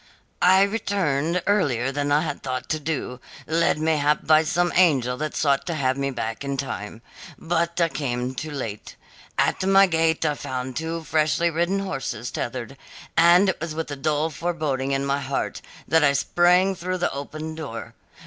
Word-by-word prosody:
"I 190 +2 +6
returned 180 -6 0
earlier 135 - +1
than 145 +1 -2
I 145 +1 +4
had 150 -3 -4
thought 130 -1 -4
to 155 - 0
do, 145 -5 -4 0.3
led 165 -1 +2
mayhap 150 -1 +1
by 155 0 +5
some 175 +2 0
angel 135 -9 +3
that 155 +2 -4
sought 140 0 +1
to 170 - -1
have 130 -3 +1
me 140 0 -1
back 115 -2 -4
in 140 0 -3
time. 115 -4 -5 0.3
But 170 +1 -1
I 170 - +4
came 130 -4 -3
too 155 +4 -5
late. 115 -8 -6 0.4
At - - +1
my 195 +1 +6
gate 165 -2 +1
I 150 - +2
found 130 -3 -5
two 165 +1 -3
freshly 160 +2 +1
ridden 175 +4 0
horses 135 - -4
tethered, 125 +2 -5 0.4
and 175 +3 +6
it 190 - -3
was 165 -2 -4
with 160 -2 -4
a - - -3
dull 150 +3 0
foreboding 150 -5 -2
in 135 0 0
my 140 0 0
heart 140 0 -3 0.3
that 160 +2 +3
I 140 -1 +4
sprang 175 +6 +3
through 185 0 -3
the 175 - -1
open 155 +3 -6
door. 145 -8 -7
155 Hz, 175 wpm, -24 LUFS, 135-170 Hz, 0.4 s, I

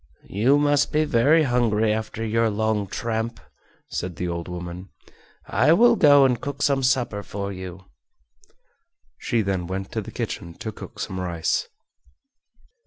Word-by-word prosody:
"You 120 +9 +3
must 145 -1 +2
be 155 0 +2
hungry 120 -6 +3
after 110 +1 -4
your 115 +1 +2
long 110 -1 0
tramp," 115 +3 -3 0.5
said 90 -1 -4
the 90 - -3
old 85 -1 -4
woman. 90 +1 -7 0.6
"I 155 - +3
will 235 +6 +6
go 145 -7 +6
and 125 -2 +1
cook 140 0 -4
some 140 -2 +2
supper 125 -5 +1
for 100 0 -5
you." 95 0 -8 1.3
She 115 -2 0
then 95 -3 -2
went 95 +1 -5
to - - -2
the - - -9
kitchen 85 0 -5
to 110 - -6
cook - - -11
some 95 - -4
rice. 85 -3 -1
110 Hz, 145 wpm, -24 LUFS, 95-135 Hz, 1.3 s, will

